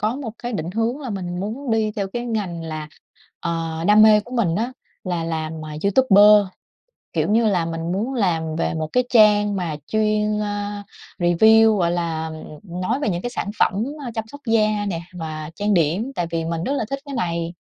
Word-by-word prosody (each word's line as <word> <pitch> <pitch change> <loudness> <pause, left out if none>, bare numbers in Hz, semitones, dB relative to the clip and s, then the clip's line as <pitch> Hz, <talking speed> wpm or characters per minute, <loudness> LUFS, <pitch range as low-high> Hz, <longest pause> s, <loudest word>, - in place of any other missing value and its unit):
có 215 +5 0
một 260 -6 -5
cái 240 0 -5
định 170 -3 -3
hướng 230 +6 -1
là 260 -5 -5
mình 180 -2 -4
muốn 235 +6 -4
đi 220 -1 +1
theo 200 -2 -1
cái 240 0 -3
ngành 195 -7 -3
là, 155 -1 -5 0.5
ờ, 165 -1 -3
đam 210 +1 +7
mê 215 -1 +7
của 240 +4 -10
mình 185 -8 +1
á 235 +6 -1 0.3
là 175 -3 -2
làm, 160 -1 -4
à, 150 -1 -7
YouTuber. 205 -2 +6 0.7
Kiểu - - 0
như 225 +1 +3
là, 185 -5 +2
mình 165 +1 -3
muốn 220 +8 -2
làm 165 -8 0
về 165 - -1
một 160 -1 -2
cái 250 0 +3
trang 210 -3 +5
mà 170 -5 -2
chuyên, 215 -1 +1
a, 205 0 -3 0.4
review, 220 +5 +5
gọi 170 -3 +1
là, 165 -2 -2
ừm, 160 +3 -8
nói 225 +9 -1
về 290 - 0
những 175 -2 -2
cái 245 - -3
sản 205 - -3
phẩm, - - +4 0.3
ơ, 245 - -4
chăm 225 -1 -2
sóc 285 +5 -12
da 215 -2 +2
nè 165 -3 -3
và 155 -3 -6
trang 205 +1 0
điểm 180 - +1
tại 175 - -1
vì 165 -1 -2
mình 165 0 -3
rất 275 - -1
là 280 - -1
thích 275 - -2
cái 280 -1 -7
này. 170 -6 -2
205 Hz, 210 wpm, -22 LUFS, 170-220 Hz, 0.7 s, đam